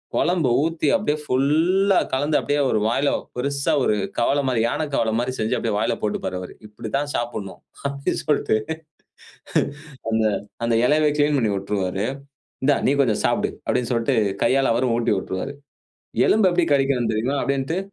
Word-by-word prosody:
குழம்பு 170 -7 +2
ஊத்தி 160 -2 -1
அப்படியே 155 -6 0
ஃபுல்லா 165 +9 +2 0.2
கலந்து 145 +3 +2
அப்படியே 145 0 0
ஒரு 110 - +2
வாயில 135 +5 +1 0.3
பெருசா 140 +4 -1
ஒரு 105 - +2 0.2
கவலை 140 +4 +2
மாதிரி, 125 -4 +1
யானைக் 145 +3 -2
கவலை 110 -1 +1
மாதிரி 130 +2 -1
செஞ்சு 110 0 0
அப்படியே 115 -3 -1
வாயில 110 - +1
போட்டுப்பாரு 105 -3 -2
அவரு. 90 - -8
"இப்படித்தான் 135 +7 -3
சாப்பிடணும்." 115 -5 -4 0.3
அப்படின்னு 140 0 -2
சொல்லிட்டு 145 -7 +2 1.5
அந்த 110 0 +2 0.4
அந்த 115 - +1
இலைய 150 +2 +3
கிளீன் 145 0 +3
பண்ணி 110 -4 +1
விட்டுருவாரு 95 0 -2 0.6
இந்தா 145 +1 +4
"நீ 140 - +4
கொஞ்சம் 115 -6 +1
சாப்பிடு" - - +1
அப்படின்னு 125 -1 0
சொல்லிட்டு 115 +2 +1 0.3
கையால 135 -2 +3
அவரும் 120 0 +1
ஊட்டி 120 - +1
உட்டுருவாரு. 95 +9 -4 0.8
"எலும்பு 210 -3 +5
எப்படி 175 -1 +2
கடிக்கணும் 135 -3 +1
தெரியுமா?" 125 +6 0
அப்படின்ட்டு 140 +5 -1
135 Hz, 150 wpm, -22 LUFS, 115-145 Hz, 1.5 s, எலும்பு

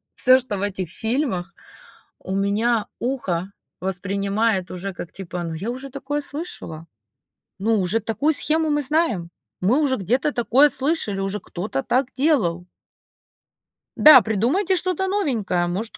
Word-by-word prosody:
всё, 255 0 +5
что 240 -5 -4
в 195 - -5
этих 195 -4 -3
фильмах, 220 - -2 0.7
у 190 - -5
меня 210 +3 +1
ухо 195 -8 -2 0.3
воспринимает 195 +1 0
уже 185 +1 -5
как 175 -1 -8
типа: 180 -2 -6
"Ну 165 -1 -4
я 200 +8 -4
уже 260 +2 -7
такое 280 +2 -3
слышала! 225 - -7 0.7
Ну, 215 +1 +1
уже 195 +5 0
такую 280 +9 0
схему 315 +1 +2
мы 295 0 +1
знаем! 255 - 0 0.3
Мы 220 +10 +2
уже 265 -3 +1
где-то 250 - 0
такое 250 +5 +4
слышали, 260 -8 +1
уже 195 +1 -2
кто-то 175 -8 -4
так 255 +1 +1
делал!" 220 - +1 1.3
Да, 295 -5 +9
придумайте 245 - +1
что-то 370 +1 -1
новенькое! 230 - 0
Может, 200 +6 -4
225 Hz, 140 wpm, -22 LUFS, 190-275 Hz, 1.3 s, Да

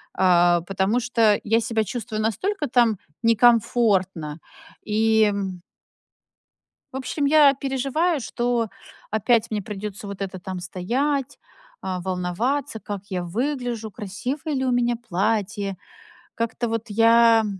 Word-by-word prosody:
А, 175 -2 +4
потому 195 +6 0
что 230 -4 +2
я 225 +2 +2
себя 225 -2 0
чувствую 220 +1 -4
настолько 295 - -1
там 235 -3 +3 0.3
некомфортно 210 -8 +2 0.4
и 220 0 +3 1.6
в - - -3
общем, 270 +3 -2
я 290 -1 +6
переживаю, 275 +5 0
что 240 -2 -1 0.4
опять 225 +2 +2
мне 210 -1 -1
придётся 205 +1 -7
вот 200 0 -7
это 190 -1 -4
там 185 +1 -6
стоять, 245 +10 -2 0.4
а, 185 -1 -3
волноваться, 190 +9 -2
как 205 -2 -6
я 180 -2 -2
выгляжу, 240 +2 -3
красивое 250 - -4
ли 265 0 -1
у 255 - +1
меня 240 -1 +2
платье. 205 -2 -2 0.6
Как-то 230 +1 -2
вот 225 0 -3
я, 230 +1 +5
225 Hz, 120 wpm, -23 LUFS, 195-245 Hz, 1.6 s, я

